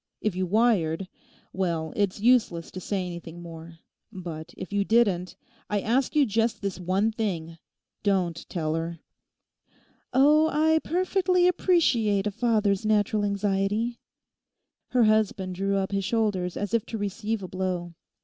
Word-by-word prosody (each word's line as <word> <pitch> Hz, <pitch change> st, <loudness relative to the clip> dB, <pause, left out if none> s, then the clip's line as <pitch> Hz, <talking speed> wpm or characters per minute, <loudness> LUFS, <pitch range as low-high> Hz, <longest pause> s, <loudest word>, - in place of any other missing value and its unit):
If 215 Hz, -4 st, -1 dB
you 185 Hz, 0 st, -1 dB
wired: 195 Hz, -5 st, +2 dB, 0.5 s
well, 170 Hz, -4 st, -2 dB
it's 200 Hz, -2 st, 0 dB
useless 220 Hz, -8 st, +2 dB
to 185 Hz, -, -6 dB
say 190 Hz, 0 st, -2 dB
anything 170 Hz, -1 st, -8 dB
more. 165 Hz, -1 st, -10 dB, 0.3 s
But 170 Hz, -4 st, -7 dB
if 195 Hz, -, -7 dB
you 200 Hz, 0 st, +2 dB
didn't, 200 Hz, -5 st, +2 dB, 0.3 s
I 210 Hz, -, +1 dB
ask 245 Hz, +8 st, 0 dB
you 295 Hz, -2 st, +5 dB
just 225 Hz, +1 st, 0 dB
this 195 Hz, -2 st, -4 dB
one 190 Hz, +5 st, +1 dB
thing. 170 Hz, -7 st, -3 dB, 0.4 s
Don't 180 Hz, -5 st, 0 dB
tell 155 Hz, -3 st, -2 dB
her!' 165 Hz, +1 st, -3 dB, 1.1 s
'Oh, 300 Hz, +4 st, +5 dB
I 315 Hz, +1 st, +3 dB
perfectly 365 Hz, 0 st, +2 dB
appreciate 245 Hz, -, +2 dB
a 210 Hz, -, 0 dB
father's 210 Hz, -3 st, +1 dB
natural 210 Hz, 0 st, +2 dB
anxiety.' 205 Hz, +3 st, 0 dB, 0.9 s
Her 250 Hz, -2 st, +3 dB
husband 215 Hz, -4 st, +2 dB
drew 195 Hz, +2 st, 0 dB
up 190 Hz, 0 st, -1 dB
his 195 Hz, 0 st, 0 dB
shoulders 195 Hz, -5 st, 0 dB
as 205 Hz, 0 st, -3 dB
if 230 Hz, -2 st, +2 dB
to 225 Hz, -, -4 dB
receive 205 Hz, +1 st, -3 dB
a -, -, -5 dB
blow. 180 Hz, -2 st, -3 dB
200 Hz, 145 wpm, -26 LUFS, 180-225 Hz, 1.1 s, you